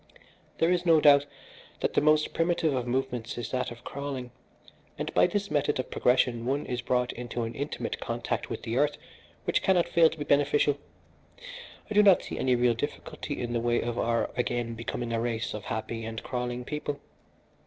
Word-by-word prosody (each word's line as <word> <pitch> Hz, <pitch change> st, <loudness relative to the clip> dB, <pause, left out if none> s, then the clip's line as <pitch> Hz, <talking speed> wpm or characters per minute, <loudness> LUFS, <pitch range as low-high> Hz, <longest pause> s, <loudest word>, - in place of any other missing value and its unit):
"There 165 Hz, +2 st, +3 dB
is 180 Hz, -1 st, +2 dB
no 165 Hz, -3 st, +5 dB
doubt 145 Hz, -1 st, +6 dB, 0.5 s
that -, -, 0 dB
the -, -, +3 dB
most 155 Hz, 0 st, +3 dB
primitive 165 Hz, -2 st, +1 dB
of 125 Hz, -2 st, -2 dB
movements 125 Hz, -2 st, -2 dB
is 120 Hz, -, -4 dB
that 130 Hz, -1 st, -1 dB
of 120 Hz, 0 st, -11 dB
crawling, 135 Hz, -3 st, -5 dB, 0.7 s
and -, -, -4 dB
by -, -, +5 dB
this 200 Hz, +1 st, -2 dB
method 145 Hz, -1 st, +1 dB
of 130 Hz, -, -4 dB
progression, 125 Hz, -2 st, +2 dB
one 135 Hz, +4 st, -1 dB
is 125 Hz, -1 st, -3 dB
brought 125 Hz, 0 st, 0 dB
into 120 Hz, 0 st, -4 dB
an 115 Hz, +1 st, -4 dB
intimate 140 Hz, +3 st, -4 dB
contact -, -, -3 dB
with -, -, -5 dB
the 115 Hz, +2 st, -2 dB
earth 145 Hz, +1 st, +2 dB, 0.5 s
which -, -, +1 dB
cannot 180 Hz, -3 st, +3 dB
fail 165 Hz, -1 st, +5 dB
to -, -, -9 dB
be 145 Hz, -, -3 dB
beneficial. 145 Hz, 0 st, +2 dB, 1.1 s
I -, -, -5 dB
do 210 Hz, -, +7 dB
not 195 Hz, -3 st, +6 dB
see -, -, -6 dB
any 130 Hz, -1 st, +3 dB
real 120 Hz, 0 st, +3 dB
difficulty 115 Hz, +6 st, -5 dB
in 120 Hz, -1 st, -3 dB
the 120 Hz, -, 0 dB
way 120 Hz, 0 st, +2 dB
of 120 Hz, 0 st, -2 dB
our 115 Hz, 0 st, +1 dB
again 120 Hz, -1 st, -1 dB
becoming 115 Hz, +1 st, -4 dB
a 115 Hz, -, 0 dB
race 115 Hz, -1 st, -2 dB
of 105 Hz, -, -6 dB
happy 115 Hz, 0 st, -4 dB
and 110 Hz, 0 st, -5 dB
crawling 125 Hz, -1 st, -3 dB
people. 145 Hz, -1 st, -4 dB
125 Hz, 195 wpm, -28 LUFS, 120-145 Hz, 1.1 s, do